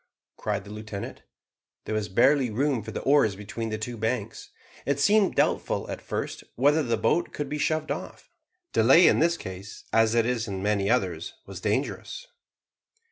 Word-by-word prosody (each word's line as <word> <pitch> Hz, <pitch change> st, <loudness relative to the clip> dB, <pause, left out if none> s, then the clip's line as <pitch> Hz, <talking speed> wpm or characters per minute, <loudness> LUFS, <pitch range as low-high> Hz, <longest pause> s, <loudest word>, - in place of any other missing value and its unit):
cried 105 Hz, -2 st, -2 dB
the 100 Hz, -, -11 dB
lieutenant. 105 Hz, -2 st, -7 dB, 0.6 s
There -, -, -3 dB
was 110 Hz, -3 st, -1 dB
barely 130 Hz, +6 st, +4 dB
room 130 Hz, +2 st, 0 dB
for 105 Hz, -, -9 dB
the -, -, -5 dB
oars 135 Hz, -8 st, +4 dB
between 110 Hz, +3 st, -5 dB
the 110 Hz, -, -2 dB
two 115 Hz, +2 st, -5 dB
banks. 110 Hz, 0 st, -3 dB, 0.3 s
It 140 Hz, 0 st, -1 dB
seemed 205 Hz, +5 st, +4 dB
doubtful, -, -, 0 dB
at -, -, -6 dB
first, -, -, -4 dB
whether 145 Hz, +5 st, +3 dB
the 115 Hz, -5 st, 0 dB
boat 170 Hz, +9 st, +1 dB
could 145 Hz, -2 st, -4 dB
be 150 Hz, +1 st, -3 dB
shoved 155 Hz, +1 st, 0 dB
off. -, -, -6 dB, 0.5 s
Delay 135 Hz, +10 st, +6 dB
in -, -, +4 dB
this 170 Hz, +1 st, +3 dB
case, 95 Hz, -, -9 dB
as 115 Hz, 0 st, +4 dB
it 115 Hz, -1 st, +3 dB
is 120 Hz, -2 st, -1 dB
in 95 Hz, -2 st, -4 dB
many 100 Hz, -1 st, +1 dB
others, 90 Hz, -9 st, -1 dB
was -, -, -9 dB
dangerous. -, -, -2 dB
115 Hz, 175 wpm, -26 LUFS, 105-140 Hz, 0.6 s, Delay